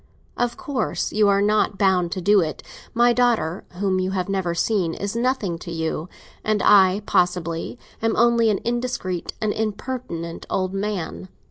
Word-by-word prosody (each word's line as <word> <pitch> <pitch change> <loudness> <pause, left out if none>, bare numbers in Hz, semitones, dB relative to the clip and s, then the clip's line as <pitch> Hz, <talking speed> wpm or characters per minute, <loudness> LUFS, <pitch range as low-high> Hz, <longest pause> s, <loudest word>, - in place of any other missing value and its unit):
Of 245 -1 -1
course 285 -10 -2
you 210 -1 +4
are 200 0 +3
not 210 -1 +2
bound 185 -3 +2
to 190 - -4
do 205 +3 +5
it. 155 -3 -4 0.3
My 240 +1 +5
daughter, 230 -9 +1
whom 185 0 0
you 185 0 0
have 180 - -1
never 190 -3 -1
seen, 175 -3 0
is 200 +2 -4
nothing 235 -8 0
to 170 - -8
you; 160 0 -3 0.3
and 215 -1 0
I, 195 0 +5
possibly, 175 +2 0 0.2
am 225 0 +1
only 235 -1 +4
an 205 - +2
indiscreet 235 -7 -2
and 215 -1 0
impertinent 215 -6 -4
old 185 0 -1
man. 195 -2 -4
200 Hz, 160 wpm, -23 LUFS, 180-225 Hz, 0.3 s, do